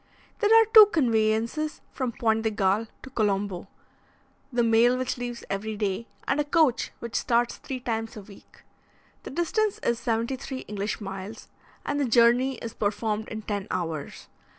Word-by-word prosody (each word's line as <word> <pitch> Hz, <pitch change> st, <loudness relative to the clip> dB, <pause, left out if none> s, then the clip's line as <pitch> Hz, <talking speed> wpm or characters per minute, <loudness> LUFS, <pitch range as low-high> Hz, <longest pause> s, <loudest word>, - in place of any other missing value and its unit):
There 420 Hz, -, +2 dB
are 450 Hz, -, +5 dB
two 435 Hz, -2 st, +11 dB
conveyances 230 Hz, -, 0 dB
from 255 Hz, -3 st, -3 dB
Pointe 225 Hz, -1 st, +1 dB
de 220 Hz, -, +1 dB
Galle 210 Hz, +1 st, +1 dB, 0.2 s
to 270 Hz, -, -10 dB
Colombo 200 Hz, -5 st, -1 dB, 0.8 s
the 240 Hz, -1 st, +1 dB
mail 230 Hz, +2 st, +4 dB
which 255 Hz, 0 st, -2 dB
leaves 245 Hz, -1 st, -6 dB
every 210 Hz, +2 st, -3 dB
day, 205 Hz, +2 st, -2 dB, 0.2 s
and 280 Hz, -, +1 dB
a -, -, +3 dB
coach 290 Hz, -4 st, +2 dB
which 235 Hz, -2 st, -7 dB
starts 240 Hz, 0 st, +1 dB
three 260 Hz, -2 st, -6 dB
times 225 Hz, -3 st, -3 dB
a -, -, -7 dB
week. 200 Hz, 0 st, -17 dB, 0.6 s
The -, -, -8 dB
distance 385 Hz, +7 st, 0 dB
is 235 Hz, -1 st, +1 dB
seventy 235 Hz, +2 st, -1 dB
three 265 Hz, 0 st, -6 dB
English 210 Hz, +1 st, -4 dB
miles, 195 Hz, +2 st, -7 dB, 0.4 s
and 290 Hz, 0 st, -1 dB
the 285 Hz, -, +2 dB
journey 240 Hz, +3 st, +4 dB
is 230 Hz, -1 st, -7 dB
performed 215 Hz, +1 st, -2 dB
in 220 Hz, -1 st, -6 dB
ten 205 Hz, -2 st, -3 dB
hours. 165 Hz, -5 st, -4 dB
230 Hz, 165 wpm, -26 LUFS, 210-255 Hz, 0.8 s, two